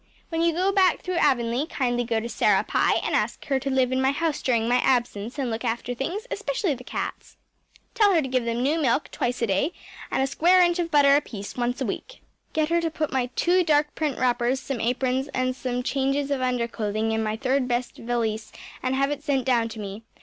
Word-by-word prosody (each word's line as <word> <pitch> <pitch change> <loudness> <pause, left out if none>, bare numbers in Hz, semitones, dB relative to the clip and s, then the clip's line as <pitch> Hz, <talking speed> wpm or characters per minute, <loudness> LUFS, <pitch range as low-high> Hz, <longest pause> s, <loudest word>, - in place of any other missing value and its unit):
When 325 -1 -1
you 335 0 +3
go 365 +4 +1
back 385 -2 +3
through 365 -1 -2
Avonlea 240 +3 +1
kindly 245 -6 0
go 230 -1 0
to 225 - -4
Sarah - - +2
Pye - - +2
and - - -2
ask - - -1
her 270 -2 +1
to 275 +1 -3
live 260 -1 +2
in 260 0 +1
my 265 - +3
house 310 +2 -1
during 230 -3 +1
my 245 +1 +3
absence 240 -2 0
and 260 -4 -1
look 225 +2 -3
after 240 +1 -2
things, 340 - -4
especially 405 -11 -1
the 250 -1 -9
cats. - - -6 0.6
Tell 425 -4 +4
her - - +5
to - - -3
give 255 -1 0
them 235 +1 -1
new 310 +4 +1
milk 275 +1 +1
twice 245 0 -2
a - - +4
day 215 - 0 0.4
and 265 - +1
a - - +3
square 345 +7 +4
inch 345 0 +2
of 340 -1 -1
butter 280 -2 +5
apiece 220 -9 -3
once 245 +2 -2
a - - +1
week. - - -6 0.3
Get 310 0 0
her 340 0 +2
to 330 - 0
put 310 -2 -3
my 255 -2 +1
two 360 +1 +3
dark 295 -2 +2
print 300 -4 -2
wrappers, 245 +1 +1
some 265 -2 -4
aprons, 255 +3 0
and 255 0 0
some 250 -1 -3
changes 275 +2 0
of 275 -2 0
underclothing 230 -3 -1
in 220 0 0
my 215 0 -1
third 260 +1 0
best 240 0 -2
valise 230 -2 -2 0.3
and 255 +1 0
have 275 +1 +1
it 290 -1 -3
sent 280 -4 0
down 235 -3 +2
to 220 0 -8
me. 200 +1 -6
260 Hz, 230 wpm, -25 LUFS, 240-295 Hz, 0.6 s, her